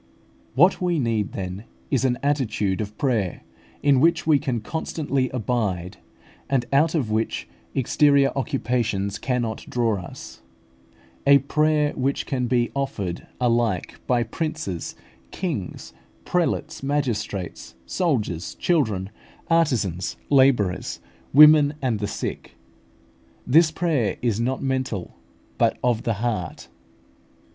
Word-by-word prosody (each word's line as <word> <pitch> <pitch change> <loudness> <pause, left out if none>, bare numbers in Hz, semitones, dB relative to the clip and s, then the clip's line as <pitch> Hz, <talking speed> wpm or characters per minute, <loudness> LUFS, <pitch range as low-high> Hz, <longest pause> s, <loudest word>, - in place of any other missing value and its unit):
What 180 +9 +4
we 175 -2 +1
need, 115 -6 0
then, 95 +2 -5 0.3
is 135 -2 +2
an 125 -1 +1
attitude 115 -9 0
of 105 0 -6
prayer, 110 - -1 0.4
in 140 -2 +5
which 165 +5 +3
we 155 -3 +4
can 130 -5 -2
constantly 140 +1 -2
abide, 105 -6 -2 0.5
and 130 -3 +1
out 155 +4 +3
of 125 -9 0
which 105 - -1 0.3
exterior 140 +1 +3
occupations 120 -8 -1
cannot 120 -4 -2
draw 115 -5 0
us; 85 - -10 0.9
a 140 0 +9
prayer 150 +2 +1
which 135 +1 -1
can 125 -2 -1
be 120 -1 +1
offered 100 -10 -3
alike 120 -6 0
by 120 -2 +2
princes, 115 - -4 0.3
kings, 140 - -5 0.3
prelates, 165 -2 -1
magistrates, 110 - -3
soldiers, 105 - -1
children, 110 - 0 0.4
artisans, 120 - +1
labourers, 130 -9 +3 0.3
women, 150 0 +7
and 125 -6 -1
the 105 - -2
sick. - - -5 0.9
This 155 +5 +5
prayer 155 - 0
is 115 -3 +1
not 130 +3 -1
mental, 130 -8 -2 0.5
but - - +3
of 120 -3 +2
the 115 - 0
heart. 105 -8 -3
125 Hz, 115 wpm, -24 LUFS, 105-145 Hz, 0.9 s, a